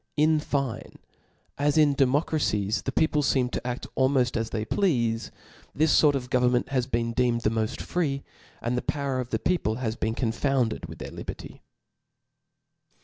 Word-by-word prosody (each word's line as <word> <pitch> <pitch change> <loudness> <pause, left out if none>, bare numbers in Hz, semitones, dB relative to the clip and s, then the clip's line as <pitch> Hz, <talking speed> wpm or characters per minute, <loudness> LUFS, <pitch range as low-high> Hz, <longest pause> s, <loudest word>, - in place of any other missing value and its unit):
In 155 +1 +4
fine, 140 -5 -3 0.6
as 145 +1 +2
in 150 -2 +5
democracies 135 -6 +1
the 130 - -3
people 150 +2 +2
feem 130 -3 +1
to - - -4
aft 125 0 -3
almoft 130 -2 +2
as 115 -1 -1
they 110 -1 -3
pleale; 115 - 0 0.5
this 155 +2 +4
fort 145 -2 +4
of 125 -2 -4
government 125 -1 +2
has 130 -2 0
been 115 -2 -1
deemed 120 -1 +1
the 110 - +1
moft 110 -1 -2
free; 140 -6 -1 0.4
and 120 +2 0
the 125 - 0
power 140 -3 -2
of 125 -1 -4
the 110 - 0
peopk 110 -4 0
ha^ 115 -3 -2
\ieen 110 -1 -2
confounded 120 - 0
with 80 0 -10
their - - -7
liberty. - - -8
125 Hz, 165 wpm, -26 LUFS, 115-140 Hz, 0.6 s, in